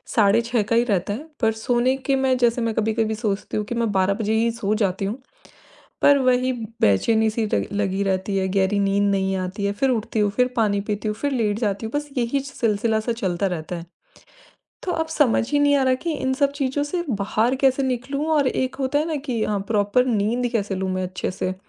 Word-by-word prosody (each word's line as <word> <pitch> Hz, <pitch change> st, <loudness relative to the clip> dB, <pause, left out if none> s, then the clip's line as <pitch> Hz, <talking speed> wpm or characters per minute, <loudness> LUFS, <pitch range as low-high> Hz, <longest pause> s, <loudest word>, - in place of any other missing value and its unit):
साढ़े 210 Hz, 0 st, +5 dB
6 235 Hz, -1 st, 0 dB
का 220 Hz, +3 st, -1 dB
ही 235 Hz, -, +4 dB
रहता 200 Hz, -4 st, 0 dB
है, 265 Hz, +9 st, -6 dB
पर 225 Hz, -2 st, +3 dB
सोने 245 Hz, +3 st, +1 dB
की 270 Hz, 0 st, 0 dB
मैं 265 Hz, -1 st, +2 dB
जैसे 240 Hz, 0 st, +2 dB
मैं 230 Hz, -1 st, 0 dB
कभी-कभी 220 Hz, 0 st, 0 dB
सोचती 210 Hz, -3 st, -3 dB
हूँ 210 Hz, -, -1 dB
कि 240 Hz, -, -4 dB
मैं 230 Hz, -2 st, 0 dB
12 190 Hz, 0 st, +2 dB
बजे 215 Hz, +1 st, -1 dB
ही 230 Hz, +1 st, +2 dB
सो 215 Hz, -2 st, -2 dB
जाती 195 Hz, -2 st, 0 dB
हूँ। 220 Hz, +6 st, -3 dB, 0.8 s
पर 285 Hz, 0 st, +6 dB
वही 255 Hz, 0 st, +2 dB, 0.3 s
बेचैनी-सी 220 Hz, -, +2 dB
लग -, -, +1 dB
लगी 200 Hz, -1 st, -1 dB
रहती 195 Hz, +1 st, -1 dB
है, 190 Hz, -, 0 dB
गहरी 195 Hz, +1 st, +1 dB
नींद 200 Hz, 0 st, +2 dB
नहीं 195 Hz, 0 st, 0 dB
आती 185 Hz, +2 st, -3 dB
है। 200 Hz, -, +1 dB
फिर 265 Hz, +6 st, +1 dB
उठती 225 Hz, -2 st, -1 dB
हूँ, 205 Hz, -1 st, +3 dB
फिर 250 Hz, +4 st, +2 dB
पानी 210 Hz, -3 st, +2 dB
पीती 210 Hz, +1 st, -2 dB
हूँ, 210 Hz, -, -1 dB
फिर 285 Hz, +5 st, -2 dB
लेट 220 Hz, -4 st, 0 dB
जाती 205 Hz, -1 st, -1 dB
हूँ, 220 Hz, -, -5 dB
बस 295 Hz, 0 st, -2 dB
यही 245 Hz, +3 st, +1 dB
चि 275 Hz, 0 st, -8 dB
सिलसिला-सा 220 Hz, +1 st, 0 dB
चलता 195 Hz, -4 st, -1 dB
रहता 175 Hz, -1 st, -4 dB
है। 170 Hz, -, -8 dB, 1.0 s
तो 360 Hz, -, -2 dB
अब 320 Hz, 0 st, -1 dB
समझ 270 Hz, -7 st, +2 dB
ही 290 Hz, -, +2 dB
नहीं 285 Hz, 0 st, +4 dB
आ 275 Hz, -, +2 dB
रहा 260 Hz, -, +3 dB
कि 335 Hz, -, 0 dB
इन 260 Hz, -2 st, -1 dB
सब 280 Hz, 0 st, +1 dB
चीज़ों 285 Hz, 0 st, -1 dB
से 345 Hz, +4 st, -2 dB
बाहर 215 Hz, +3 st, +1 dB
कैसे 270 Hz, 0 st, +3 dB
निकलूँ, 265 Hz, +4 st, -2 dB
और 290 Hz, -3 st, +3 dB
एक 260 Hz, 0 st, -1 dB
होता 270 Hz, +1 st, 0 dB
है 310 Hz, -, 0 dB
ना 315 Hz, -, -1 dB
कि 235 Hz, -4 st, -1 dB
अ, 210 Hz, -1 st, -1 dB
प्रॉपर 210 Hz, +4 st, +2 dB
नींद 235 Hz, +2 st, 0 dB
कैसे 205 Hz, -3 st, -1 dB
लूँ 190 Hz, 0 st, -2 dB
मैं 185 Hz, 0 st, -2 dB
अच्छे 185 Hz, 0 st, -3 dB
से? 185 Hz, 0 st, -3 dB
225 Hz, 225 wpm, -22 LUFS, 200-255 Hz, 1.0 s, पर